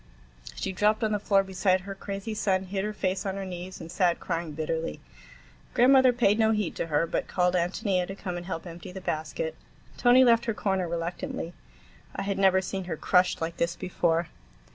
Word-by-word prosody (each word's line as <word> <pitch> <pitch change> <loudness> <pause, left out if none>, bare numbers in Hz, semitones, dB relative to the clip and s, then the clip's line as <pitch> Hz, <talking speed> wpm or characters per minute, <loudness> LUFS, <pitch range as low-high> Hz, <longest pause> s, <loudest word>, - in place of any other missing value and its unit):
She 195 - -3
dropped 210 +3 +2
on 215 - +1
the 210 - +1
floor 195 -1 +3
beside 190 -1 +1
her 195 +2 -6
crazy 200 +2 -5
son, 195 -3 +1
hid 190 +1 -3
her 210 - -2
face 190 -2 -1
on 195 -2 -2
her 195 -1 -4
knees, 180 0 -7
and 165 - -8
sat 180 -1 +2
crying 165 -2 -3
bitterly. 160 - -3 0.8
Grandmother 260 +1 +6
paid 230 -3 +2
no 220 0 +4
heed 210 -5 0
to - - -2
her, 155 +1 +2
but - - -2
called 180 -1 +1
Ántonia 180 +1 0
to 195 - -6
come 185 -3 -5
and 175 0 -6
help 165 -2 -4
empty 170 +1 -9
the 190 - -7
basket. 190 - -3 0.4
Tony 250 +1 +6
left 235 -1 +4
her 225 - -1
corner 190 -4 0
reluctantly. 170 +5 -4 0.6
I - - -2
had 195 -1 -2
never 190 -1 +5
seen 190 0 -4
her 165 -3 -4
crushed 180 +1 +2
like 165 +1 -3
this 170 +1 0
before. 170 -2 0
190 Hz, 200 wpm, -27 LUFS, 175-210 Hz, 0.8 s, Grandmother